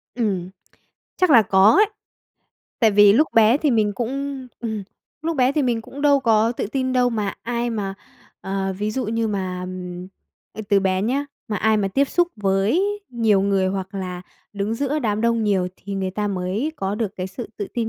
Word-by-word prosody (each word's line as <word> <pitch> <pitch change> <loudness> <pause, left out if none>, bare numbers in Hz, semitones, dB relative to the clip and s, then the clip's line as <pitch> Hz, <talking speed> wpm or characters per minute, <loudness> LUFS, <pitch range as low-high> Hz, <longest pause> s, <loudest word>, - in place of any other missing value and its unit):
Ừm. 195 -7 -1 0.7
Chắc 365 -2 +3
là 240 -6 +8
có 195 +1 +5
ấy. 420 - +6 1.0
Tại 220 -2 +5
vì 205 0 +7
lúc 300 +8 +4
bé 225 +3 +6
thì 295 -2 +1
mình 215 -3 +2
cũng 270 +3 -4
ừm, 220 -3 -3 0.4
lúc 325 -1 -2
bé 255 +1 +3
thì 300 - +1
mình 235 -3 0
cũng 280 +4 -9
đâu 285 -2 +4
có 225 -1 +3
tự - - -3
tin 260 +3 -2
đâu, 250 -1 +3
mà 210 -4 -2
ai 240 0 -2
mà, 200 -3 -3 0.5
ờ, 195 0 -2
ví 210 +1 -1
dụ 260 +4 -2
như 225 0 -1
mà, 185 -3 -3 0.9
à, - - -7
từ 200 -1 +4
bé 190 0 0
nhá, 275 +6 0 0.2
mà 210 - -1
ai 220 +2 +2
mà 200 -2 0
tiếp 275 +9 +2
xúc 350 -1 +2
với 200 - +1 0.3
nhiều 225 -5 +2
người 195 -1 +1
hoặc 190 +1 -4
là 180 -2 -5 0.3
đứng 205 +2 -2
giữa 285 +4 -1
đám 215 -5 -1
đông 230 -1 +1
nhiều 190 -3 +1
thì 200 +1 -7
người 190 -1 -2
ta 205 +2 -2
mới 195 +10 -2
có 195 +1 -2
được 210 -2 -3
cái 185 0 -3
sự 220 +5 -7
tự 205 - -4
tin 230 -2 -1
215 Hz, 200 wpm, -22 LUFS, 195-250 Hz, 1.0 s, là